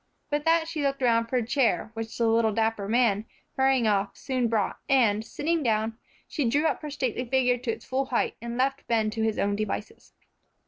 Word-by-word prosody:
With 295 Hz, +1 st, -1 dB
that 325 Hz, 0 st, +3 dB
she 325 Hz, -2 st, -3 dB
looked 275 Hz, -1 st, -1 dB
around 230 Hz, -1 st, +3 dB
for 255 Hz, -, -3 dB
a 245 Hz, -3 st, +1 dB
chair, 245 Hz, -2 st, +1 dB
which 225 Hz, 0 st, -6 dB
the 235 Hz, -, +1 dB
little 225 Hz, 0 st, +3 dB
dapper 220 Hz, -2 st, 0 dB
man, 225 Hz, -3 st, +2 dB, 0.3 s
hurrying 265 Hz, -2 st, +3 dB
off, 200 Hz, -1 st, 0 dB
soon 255 Hz, -3 st, -1 dB
brought, 220 Hz, -3 st, -1 dB
and, 225 Hz, -6 st, +3 dB
sitting 320 Hz, +8 st, -1 dB
down, 220 Hz, -3 st, 0 dB, 0.3 s
she 280 Hz, -7 st, -1 dB
drew 290 Hz, +6 st, +1 dB
up -, -, 0 dB
her 300 Hz, -, -5 dB
stately 260 Hz, -4 st, -2 dB
figure 250 Hz, 0 st, +2 dB
to 245 Hz, -1 st, -2 dB
its -, -, -8 dB
full 265 Hz, +1 st, -1 dB
height, 250 Hz, -2 st, -1 dB
and 235 Hz, 0 st, -5 dB
left 270 Hz, +2 st, 0 dB
Ben 220 Hz, -2 st, +1 dB
to 225 Hz, +1 st, -3 dB
his 220 Hz, -1 st, 0 dB
own 200 Hz, 0 st, +1 dB
devices. 215 Hz, 0 st, -5 dB
235 Hz, 210 wpm, -27 LUFS, 220-270 Hz, 0.3 s, that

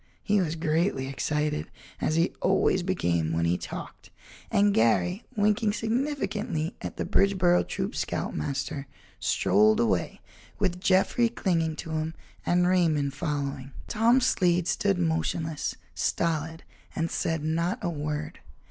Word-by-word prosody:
He 205 Hz, -1 st, +2 dB
was 165 Hz, -2 st, -1 dB
greatly 160 Hz, -3 st, 0 dB
excited, 150 Hz, +2 st, -1 dB, 0.3 s
as 155 Hz, -, 0 dB
he 165 Hz, +1 st, +2 dB
always 190 Hz, 0 st, +3 dB
became 85 Hz, -, 0 dB
when 85 Hz, +1 st, +1 dB
he 85 Hz, +1 st, +2 dB
talked -, -, -8 dB, 0.4 s
and 205 Hz, 0 st, +3 dB
Garry 175 Hz, -, +2 dB
winking 210 Hz, +1 st, +2 dB
significantly 220 Hz, -, -2 dB
at -, -, -6 dB
the -, -, -2 dB
Bridgeboro 185 Hz, -3 st, +3 dB
Troop's -, -, -3 dB
scoutmaster, 135 Hz, -, -3 dB, 0.3 s
strolled 105 Hz, +3 st, +3 dB
away 100 Hz, -7 st, 0 dB, 0.4 s
with 180 Hz, -3 st, -1 dB
Jeffrey 195 Hz, +5 st, +3 dB
clinging 165 Hz, -8 st, 0 dB
to 160 Hz, -, -7 dB
him 160 Hz, +1 st, -2 dB, 0.3 s
and 180 Hz, 0 st, +3 dB
Raymond 160 Hz, -6 st, +2 dB
following. 140 Hz, -3 st, -3 dB
Tom 235 Hz, +4 st, +3 dB
Slade 180 Hz, -7 st, +2 dB
stood 200 Hz, -2 st, +1 dB
motionless, 160 Hz, -2 st, -1 dB, 0.2 s
stolid, 160 Hz, -1 st, -1 dB, 0.3 s
and 165 Hz, +1 st, -1 dB
said 160 Hz, -2 st, -1 dB
not 165 Hz, +3 st, 0 dB
a 175 Hz, -, 0 dB
word. 150 Hz, 0 st, -4 dB
165 Hz, 130 wpm, -27 LUFS, 150-190 Hz, 0.4 s, always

